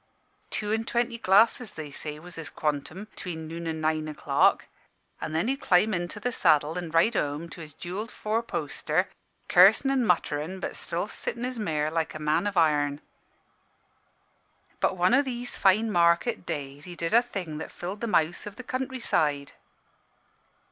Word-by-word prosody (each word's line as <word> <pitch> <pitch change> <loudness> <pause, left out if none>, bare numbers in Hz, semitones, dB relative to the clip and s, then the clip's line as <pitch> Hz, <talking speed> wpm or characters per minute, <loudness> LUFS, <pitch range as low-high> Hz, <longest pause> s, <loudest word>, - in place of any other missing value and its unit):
Two 210 0 -2
an' 225 0 0
twenty 235 0 -1
glasses, 220 +3 +4
they 155 -2 -7
say, 150 +1 -5
was 175 +3 -12
his 165 -2 -6
quantum' 155 +5 -3
between 170 -6 -7
noon 165 +1 -6
an' 160 -1 -3
nine 155 0 0
o'clock; 150 - +2 0.6
an' - - -3
then 160 +8 0
he'd 275 +2 -1
climb 200 +4 +3
into 175 +2 -3
saddle 150 -7 +3
an' 175 -2 -4
ride 165 +8 +3
home 150 -2 -1
to 170 - -9
his 150 -2 -10
jewelled 195 +6 -5
four 215 +2 -1
poster, 235 - -1 0.4
cursin' 270 - +6
an' 265 -2 +2
mutterin', 175 -2 0
but - - -4
sittin' 235 - -4
his 250 -1 -3
mare 155 -6 -1
like 160 -1 -1
a - - -5
man 155 +6 +1
of 200 -2 -3
iron. 145 -3 +3 1.8
"But 190 - +1
one 180 +5 +3
o' 275 - +6
these 245 -3 -4
fine 215 +4 +3
market 170 +4 +2
days 145 -2 -5
he 175 - -8
did 165 +2 -3
a 235 - +7
thing 180 -10 -5
that - - -6
filled 190 +4 -6
the 235 - -1
mouths 175 -2 +1
o' - - -2
the 205 +5 -10
country 255 0 -4
side. 145 - 0
175 Hz, 170 wpm, -27 LUFS, 155-220 Hz, 1.8 s, a